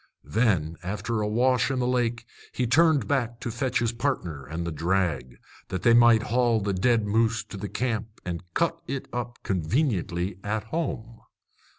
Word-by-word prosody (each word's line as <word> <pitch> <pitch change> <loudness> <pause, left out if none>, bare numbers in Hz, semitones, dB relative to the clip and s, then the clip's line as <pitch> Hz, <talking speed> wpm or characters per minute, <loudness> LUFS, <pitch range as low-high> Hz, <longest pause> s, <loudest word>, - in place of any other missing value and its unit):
Then, 95 -9 +1
after 105 +4 -2
a 105 - 0
wash 125 +5 +2
in 135 - -1
the 125 - 0
lake, 120 -2 0 0.3
he 125 - -1
turned 155 +4 +4
back 120 -4 -1
to 120 - -3
fetch 125 +2 -1
his 120 -1 +1
partner 90 - -3
and 80 +4 -4
the 85 - -2
drag, 80 -6 -1 0.3
that 95 -2 -4
they 120 - +6
might 120 -1 +6
haul 120 -1 +2
the 100 -1 -1
dead 110 +3 +2
moose 115 +2 +1
to - - -11
the 100 +1 -5
camp 115 -5 -1 0.2
and 85 -2 -3
cut 165 0 +1
it 135 -1 -4
up 120 0 -4
conveniently 95 - -1
at 105 +1 -2
home. 115 -4 -4
115 Hz, 175 wpm, -26 LUFS, 95-125 Hz, 0.3 s, they